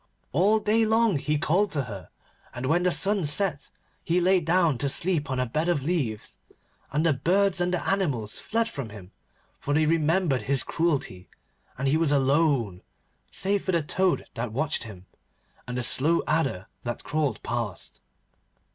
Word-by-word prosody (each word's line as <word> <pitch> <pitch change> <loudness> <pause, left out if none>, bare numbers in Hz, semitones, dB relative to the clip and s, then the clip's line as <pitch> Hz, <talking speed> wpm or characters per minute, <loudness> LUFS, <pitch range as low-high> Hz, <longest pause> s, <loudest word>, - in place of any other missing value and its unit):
All 195 +9 +3
day 215 +1 +2
long 220 -6 +2
he 150 +2 0
called 185 +8 +1
to 140 -3 0
her, 100 -6 -9 0.5
and, 120 +2 -4
when 160 +6 +2
the 180 0 +2
sun 200 +1 +2
set 150 0 +1 0.3
he 170 +2 +1
lay 185 +1 +4
down 165 -5 +2
to 140 - +1
sleep 165 -1 0
on 130 -1 -1
a 125 - +1
bed 155 +8 -1
of 155 -6 0
leaves, 140 -10 -2 0.5
and 150 +3 0
the 160 - +4
birds 180 +6 +1
and 175 0 +1
the 180 - -2
animals 145 - -1
fled 230 +1 0
from 140 - -6
him, 100 -3 -12 0.5
for 145 - -2
they 155 +1 +3
remembered 160 -3 +1
his 135 +5 +1
cruelty, 145 - -2 0.5
and 135 +2 -1
he 145 +3 +3
was 160 -3 +1
alone 135 - +1 0.5
save 200 +1 0
for 185 - -1
the 170 -2 +2
toad 185 +4 0
that 115 -1 -4
watched 145 +1 -1
him, 95 -5 -11 0.6
and 125 0 -4
the 125 - -1
slow 155 +7 +2
adder 135 - 0 0.2
that 120 0 -5
crawled 145 -7 -2
past. 115 -5 -5
155 Hz, 175 wpm, -26 LUFS, 130-180 Hz, 0.6 s, lay